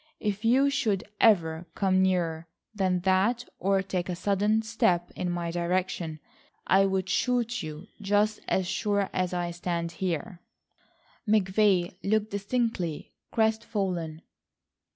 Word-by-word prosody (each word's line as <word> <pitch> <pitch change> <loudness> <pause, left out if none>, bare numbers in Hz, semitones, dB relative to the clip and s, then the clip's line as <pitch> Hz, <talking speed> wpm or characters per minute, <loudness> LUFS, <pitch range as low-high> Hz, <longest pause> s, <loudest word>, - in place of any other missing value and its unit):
If 210 0 -2
you 265 +5 +4
should 210 -8 0 0.2
ever 170 -6 +3
come 190 -1 +2
nearer 170 -3 0 0.3
than 185 -3 0
that 195 +6 +2
or 195 +1 +2
take 185 -2 -3
a 180 - -1
sudden 205 +4 +1
step 220 -6 +1
in 180 - -2
my 175 -1 -2
direction, 175 -2 -1 0.5
I'd 190 -1 +3
shoot 240 +2 0
you 155 +2 -7 0.2
just 205 +2 +2
as 190 - +1
sure 200 +1 0
as 185 -1 0
I 175 -1 -2
stand 170 -1 -3
here." 175 +1 -3 0.9
McVay 195 -3 +3
looked 215 +1 0
distinctly 200 -5 -2 0.2
crestfallen. 200 -8 -1
190 Hz, 120 wpm, -28 LUFS, 175-215 Hz, 0.9 s, you